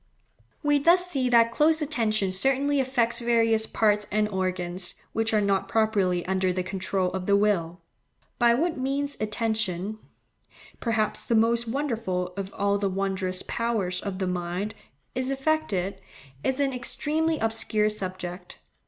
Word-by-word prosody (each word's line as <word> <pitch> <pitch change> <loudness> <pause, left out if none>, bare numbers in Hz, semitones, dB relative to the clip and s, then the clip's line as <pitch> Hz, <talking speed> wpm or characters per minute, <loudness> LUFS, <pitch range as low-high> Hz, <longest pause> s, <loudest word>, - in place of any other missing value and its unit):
We 290 0 +3
thus 345 +5 +5
see 270 -8 +1
that 230 -1 +5
close 315 +4 +3
attention 220 - +1
certainly 270 +8 +2
affects 250 -3 +1
various 230 -2 +2
parts 210 -1 +1
and 210 +1 +2
organs, 185 -2 -1 0.2
which 225 0 0
are 215 - +3
not 200 -1 +1
properly 200 -6 +1
under 190 0 +1
the 180 0 -2
control 185 0 -1
of 190 -1 -4
the 200 - +4
will. 185 -5 +1 0.6
By 235 -1 +5
what 320 +2 -1
means 280 +2 -1
attention—perhaps 215 +1 -3
the 230 - +1
most 230 +1 +2
wonderful 225 -9 -2
of 195 -1 -5
all 200 0 +1
the 200 -1 0
wondrous 190 -1 -2
powers 215 -6 -2
of 200 -2 -4
the 190 - -1
mind—is 180 - -4
effected, 270 - -1 0.4
is 265 +1 0
an 275 -2 +1
extremely 310 +6 0
obscure 220 -2 0
subject. 185 -3 -6
215 Hz, 135 wpm, -26 LUFS, 190-250 Hz, 0.6 s, thus